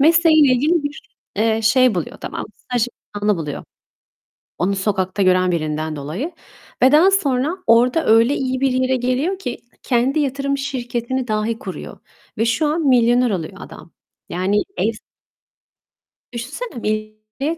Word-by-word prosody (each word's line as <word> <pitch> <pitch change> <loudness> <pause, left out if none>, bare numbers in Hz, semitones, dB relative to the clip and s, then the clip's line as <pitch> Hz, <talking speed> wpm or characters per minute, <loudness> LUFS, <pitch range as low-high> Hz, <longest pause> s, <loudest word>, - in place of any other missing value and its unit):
Mesleğiyle 315 -2 +5
ilgili 300 +6 +2
bir, 290 0 -5 0.4
eee, 220 +1 +1
şey 250 +1 +4
buluyor 175 -4 -4
tamam - - -5
mı? - - -7
Staj 245 -2 -1 0.3
imkânı 205 0 +1
buluyor. 150 -3 -5 0.9
Onu 195 +3 0
sokakta 190 0 -1
gören 185 -1 +3
birinden 155 -1 -2
dolayı 155 - -4 0.5
ve 260 - +6
daha 330 +6 +6
sonra 300 -3 +1
orada 245 +7 +4
öyle 230 +5 +4
iyi 260 -1 -2
bir 270 -1 +2
yere 255 +1 +1
geliyor 260 +10 -1
ki, 250 -11 -4 0.3
kendi 255 +4 +1
yatırım 280 0 -1
şirketini 255 -2 -3
dahi 215 +1 -1
kuruyor 190 - -8 0.4
ve 225 - +1
şu 235 +7 +1
an 310 0 0
milyoner 245 -1 +4
oluyor 170 -5 -3
adam. - - -12 0.4
Yani 195 +4 0 0.2
evs 220 0 0 1.4
Düşünsene 235 - -4
245 Hz, 135 wpm, -20 LUFS, 210-275 Hz, 1.4 s, ve